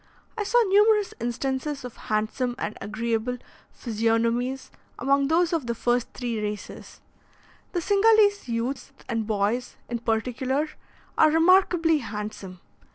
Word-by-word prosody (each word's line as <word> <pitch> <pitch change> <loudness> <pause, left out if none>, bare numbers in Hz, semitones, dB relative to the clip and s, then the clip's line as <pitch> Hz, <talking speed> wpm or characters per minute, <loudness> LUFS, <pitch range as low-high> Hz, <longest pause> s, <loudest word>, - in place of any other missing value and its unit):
I 435 - -2
saw 485 +4 +3
numerous 415 0 +4
instances 265 +4 -3
of 245 - -8
handsome 220 +4 -2
and 210 - -4
agreeable 225 +3 -2 0.3
physiognomies 230 +3 -1 0.3
among 275 0 +2
those 335 +3 +2
of 310 -7 -1
the 235 - -1
first 240 +1 0
three 235 -4 -3
races; 210 0 -6 0.7
the 350 - 0
Cingalese 410 -1 +4
youths 245 +4 -3
and 225 -3 -2
boys, 215 +3 -1
in 240 0 -2
particular, 255 +6 -1 0.5
are 310 - +7
remarkably 330 -1 +4
handsome. 210 -5 -7
250 Hz, 120 wpm, -25 LUFS, 225-325 Hz, 0.7 s, are